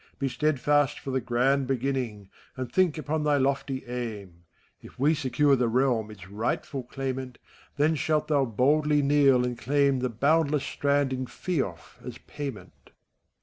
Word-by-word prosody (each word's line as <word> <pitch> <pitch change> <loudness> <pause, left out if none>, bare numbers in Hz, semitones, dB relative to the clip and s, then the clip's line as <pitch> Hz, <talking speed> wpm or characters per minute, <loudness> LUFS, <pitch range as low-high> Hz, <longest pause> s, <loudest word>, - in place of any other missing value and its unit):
Be 140 - -1
steadfast 145 +1 +1
for 135 - -6
the 130 0 0
grand 130 +3 +1
beginning, 125 -6 -2 0.3
And 130 -2 -5
think 180 -4 +2
upon 155 0 -2
thy 150 -1 +3
lofty 135 0 -1
aim! 105 -8 -6 0.4
If - - -14
we 145 +5 +3
secure 145 -1 +2
the 125 -2 +1
realm 120 -2 +1
its 95 -5 -11
rightful 115 +6 -3
claimant, 130 -1 -5 0.4
Then 150 +2 +3
shalt 155 -1 0
thou 145 -3 +2
boldly 145 +5 +2
kneel, 140 -3 +4
and 125 0 -2
claim 140 +2 +1
The 125 0 -1
boundless 145 +4 +2
strand 140 -2 0
in 130 0 -3
feoff, 130 - -4
as - - -7
payment. 140 -7 -7
FAUST. - - -25
135 Hz, 155 wpm, -27 LUFS, 125-145 Hz, 0.4 s, kneel